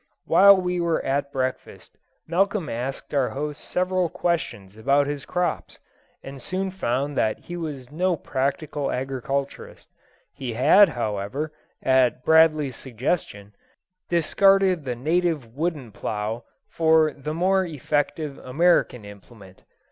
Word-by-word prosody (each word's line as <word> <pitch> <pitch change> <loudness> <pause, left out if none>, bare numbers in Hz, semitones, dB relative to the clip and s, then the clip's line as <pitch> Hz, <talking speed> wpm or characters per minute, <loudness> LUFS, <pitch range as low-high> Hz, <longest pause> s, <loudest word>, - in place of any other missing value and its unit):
While 200 0 +7
we 180 -1 -1
were 170 -1 0
at 140 +1 -1
breakfast, 130 -1 -4 0.3
Malcolm 195 +1 0
asked 125 +6 -5
our 135 -3 +2
host 150 +1 -5
several 185 -1 0
questions 120 - -3
about 140 +6 +2
his 145 -1 -4
crops, 180 0 -2 0.5
and 135 -1 -9
soon 190 +1 -3
found 140 -5 -2
that 110 -4 +1
he 175 - -9
was 145 -6 -6
no 180 +3 +1
practical 140 +1 -2
agriculturist. 135 +1 -4 0.4
He 130 -4 -5
had, 185 - +6
however, 120 +5 -3 0.3
at 130 -1 +2
Bradley's 155 -5 +4
suggestion, 115 - -3 0.6
discarded 185 0 +3
the 125 -2 -2
native 155 -3 -1
wooden 150 -6 -3
plough 105 +3 -4 0.2
for 160 -2 +3
the 150 +2 -5
more 190 +3 +2
effective 150 -2 -2
American 130 -5 +1
implement. 100 -1 -14
145 Hz, 120 wpm, -24 LUFS, 125-170 Hz, 0.6 s, While